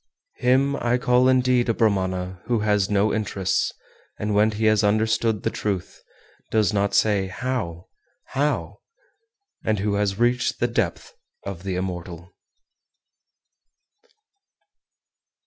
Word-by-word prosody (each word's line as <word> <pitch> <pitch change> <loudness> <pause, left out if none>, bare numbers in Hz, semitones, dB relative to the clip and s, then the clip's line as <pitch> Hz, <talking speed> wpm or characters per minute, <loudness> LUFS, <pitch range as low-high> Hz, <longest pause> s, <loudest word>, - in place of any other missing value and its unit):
411. 125 - 0
Him 135 +2 +3 0.2
I - - +4
call 125 +1 +3
indeed 125 -1 +3
a 115 - +2
Brahmana 95 -4 0
who 120 -3 0
has 105 -2 +1
no 105 +1 +2
interests, 100 -3 -1 0.5
and 105 0 -2
when 105 +1 +4
he 110 +1 -2
has 110 -1 +4
understood 110 +1 +1
(the - - 0
truth), 100 -4 -4 0.5
does 105 -4 +2
not 100 0 +1
say 100 -3 +2
How, 95 -6 -4 0.4
how? 145 +3 -1 0.8
and 110 -1 +1
who 100 +1 -1
has 100 -1 0
reached 120 +1 +1
the 120 - +2
depth 115 -7 -2 0.3
of 100 -3 -6
the 95 -1 -3
Immortal. 90 -1 -5
105 Hz, 125 wpm, -23 LUFS, 95-120 Hz, 0.8 s, I